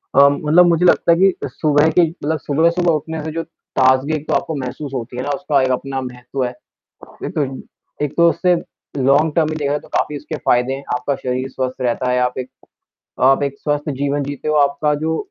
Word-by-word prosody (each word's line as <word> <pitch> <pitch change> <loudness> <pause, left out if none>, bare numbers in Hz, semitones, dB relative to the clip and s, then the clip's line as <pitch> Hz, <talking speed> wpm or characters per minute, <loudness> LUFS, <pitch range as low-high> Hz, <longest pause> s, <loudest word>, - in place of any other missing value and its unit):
अ, 140 0 +8
मतलब 150 +5 +4
मुझे 170 +1 +3
लगता 175 - +4
है 170 - +4
कि 190 -5 +2
सुबह 150 +3 +2
की 175 - +3
मतलब 160 -2 -3
सुबह-सुबह 170 +5 +2
उठने 155 +1 -3
से 155 - -4
जो 165 +1 -3 0.4
ताजगी 130 +3 +3
एक 155 0 -6
तो - - 0
आपको 160 - -1
महसूस 135 +2 -5
होती 125 -1 -5
है 125 - -2
ना, 145 - -4
उसका 150 -6 +1
एक 130 - +1
अपना 135 +1 -2
महत्व 125 +1 -5
है। 125 - -3 0.7
एक - - -5
तो 150 -4 +1
इ 135 0 -7 0.4
एक 145 - -3
तो 170 0 +6
उससे 180 +2 +2 0.4
लॉन्ग 140 +4 +3
टर्म 160 -2 +3
में 155 - -3
देखा 140 -1 -1
जाए 150 - 0
तो - - -17
काफ़ी 150 - -1
उसके 150 +2 -6
फ़ायदे 125 +2 +3
हैं, 140 - -8
आपका 125 +3 -1
शरीर 130 +1 -3
स्वस्थ 130 0 -4
रहता 125 +1 0
है, 125 - +2
आप 125 +1 -1
एक 130 - -4 0.7
आप 135 +2 +5
एक 140 -1 -2
स्वस्थ 145 0 -2
जीवन 140 +1 0
जीते 145 +1 -5
हो, 155 - +1
आपका 145 +1 +2
जो 160 0 0
145 Hz, 225 wpm, -19 LUFS, 130-155 Hz, 0.7 s, अ